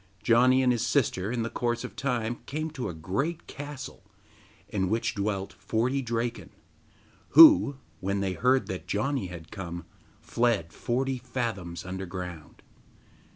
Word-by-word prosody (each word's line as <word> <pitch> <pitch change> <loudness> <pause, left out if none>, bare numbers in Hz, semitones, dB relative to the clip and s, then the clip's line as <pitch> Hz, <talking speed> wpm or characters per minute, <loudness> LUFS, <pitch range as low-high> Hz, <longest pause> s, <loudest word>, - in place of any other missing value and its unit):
Janni 125 +3 +5
and 125 - +4
his 120 -2 0
sister 110 -8 +1
in 115 -2 -1
course 120 0 -1
of - - -7
time 120 -4 -1
came 155 +3 -3
to 130 -8 -4
a - - -5
great 135 - -2
castle, 145 -2 -8 0.7
in 95 -3 -1
which 115 +2 0
dwelt 100 -2 -2
forty 125 +5 -1
Draken, 120 -1 -3 0.9
who, 300 - +9 0.2
when 100 +1 -1
they 95 -1 -1
heard 130 +8 +2
that 95 - -6
Janni 130 0 -1
had 85 -2 -10
come, 85 -4 -6 0.3
fled 115 -9 0
forty 130 +1 -1
fathoms 110 -9 -4
underground. 90 -3 -7
115 Hz, 135 wpm, -28 LUFS, 95-130 Hz, 0.9 s, who